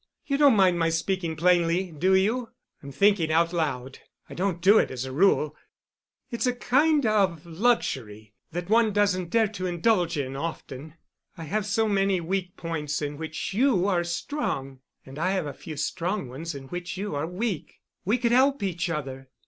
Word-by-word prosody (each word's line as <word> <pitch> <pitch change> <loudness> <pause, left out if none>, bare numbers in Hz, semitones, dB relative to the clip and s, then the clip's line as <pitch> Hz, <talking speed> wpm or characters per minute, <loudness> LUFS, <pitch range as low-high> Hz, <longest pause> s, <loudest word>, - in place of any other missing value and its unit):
You 275 - 0
don't 285 -5 +6
mind 185 -3 +4
my 165 0 +2
speaking 165 0 -1
plainly, 175 +1 +2
do 185 +5 +2
you? 225 +5 +1 0.3
I'm 140 - -9
thinking 180 +1 +3
out 165 +2 +2
loud. 135 -6 -2 0.3
I - - -10
don't 185 -1 -1
do 200 +5 +6
it - - +1
as 130 0 -4
a 130 - -6
rule. 155 -1 +2 0.8
It's 235 +1 -1
a 250 - +1
kind 285 +4 +2
of 195 -7 +1
luxury 130 - -1 0.2
that 175 +1 -4
one 220 0 +3
doesn't 190 -4 +1
dare 225 +3 +3
to 185 -3 -4
indulge 175 -1 +1
in 135 -1 -3
often. 155 -1 -6 0.4
I 165 - -7
have 205 +6 -2
so 220 +2 +1
many 195 -2 +2
weak 180 +1 -3
points 150 -3 -3
in 145 -1 -4
which 160 +4 -5
you 230 -4 +3
are 180 -3 +1
strong, 170 - -3 0.3
and 135 +2 -10
I 185 +4 +1
have 185 -4 -1
a 145 - -5
few 155 -2 -9
strong 175 +2 -2
ones 155 +5 -6
in 140 - -7
which 175 +1 -5
you 205 -1 -4
are 145 +2 -2
weak, 185 0 -4 0.2
we 215 +6 +1
could 235 -1 0
help 265 -1 +3
each 175 -3 -2
other. 135 -4 -5
175 Hz, 185 wpm, -26 LUFS, 155-205 Hz, 0.8 s, don't